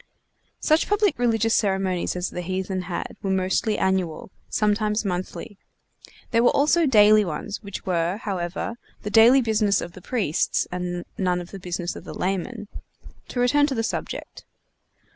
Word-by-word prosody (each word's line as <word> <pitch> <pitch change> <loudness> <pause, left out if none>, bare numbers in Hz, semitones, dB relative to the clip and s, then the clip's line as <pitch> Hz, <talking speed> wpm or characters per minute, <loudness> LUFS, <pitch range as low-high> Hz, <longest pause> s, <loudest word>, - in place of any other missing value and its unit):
Such 310 +1 +2
public 415 - +2
religious 225 -2 +2
ceremonies 190 -4 0
as 180 0 -2
the 180 - -4
heathen 185 +1 -3
had 175 - -4
were 195 - -2
mostly 190 +3 +1
annual, 190 -3 -1 0.2
sometimes 210 0 +1
monthly. 185 +2 -4 0.7
There 230 - +3
were 245 - +5
also 310 +3 +3
daily 215 -3 +6
ones, 190 +4 -5
which 200 -3 -8
were, 175 +1 0
however, 195 +2 -4 0.3
the 210 - -4
daily 235 +5 +7
business 215 -4 +2
of 175 - -5
the 185 - -12
priests, 200 - 0
and 180 -1 -4
none 180 -2 +1
of 175 0 -9
the 195 - -8
business 175 -1 -4
of - - -9
the - - -8
laymen. 200 +4 -3 0.6
To 245 - -4
return 290 +4 +4
to 275 - -2
the 225 - 0
subject. - - -5
200 Hz, 160 wpm, -24 LUFS, 180-225 Hz, 0.7 s, daily